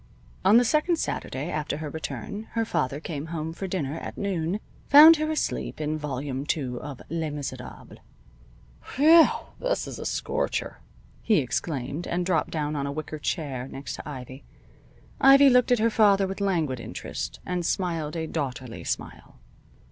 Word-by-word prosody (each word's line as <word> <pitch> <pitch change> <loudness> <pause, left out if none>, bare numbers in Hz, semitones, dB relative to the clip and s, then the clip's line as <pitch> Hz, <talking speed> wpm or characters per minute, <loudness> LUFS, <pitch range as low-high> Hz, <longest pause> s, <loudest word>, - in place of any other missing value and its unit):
On 215 - +6
the 245 - +5
second 305 +7 +2
Saturday 150 - -3
after 150 -1 -2
her 155 0 -5
return 205 +7 -6
her 230 -1 0
father 140 - -1
came 155 -1 -5
home 160 -1 -4
for 190 +3 -5
dinner 165 -5 -3
at - - -8
noon, 190 -1 -1 0.3
found 310 +3 +10
her 310 +1 -1
deep - - -2
in 155 0 -1
Volume 140 -2 -4
Two 135 -5 -2
of 145 -3 -8
"Les 165 -1 -2
Miserables." 135 -4 -7 1.0
"Whew! 320 +4 +8 0.3
This - - -1
is - - -7
a - - -6
scorcher!" - - -2 0.4
he 220 - +3
exclaimed, 140 +2 -2
and 175 +1 -1
dropped 175 -4 +1
down 150 -1 -2
on 140 -1 -2
a - - -3
wicker 155 +1 -5
chair 140 -6 -3
next 135 +1 -7
to - - -7
Ivy. 130 -1 -8 0.8
Ivy 275 0 +7
looked 250 0 +4
at 245 - +5
her 230 +1 +2
father 200 -3 +4
with 190 +1 -5
languid 165 -10 0
interest, - - -6
and 180 -1 -2
smiled 165 -4 -1
a 160 -1 -2
daughterly 130 -6 -4
smile. - - -5
160 Hz, 165 wpm, -26 LUFS, 145-200 Hz, 1.0 s, found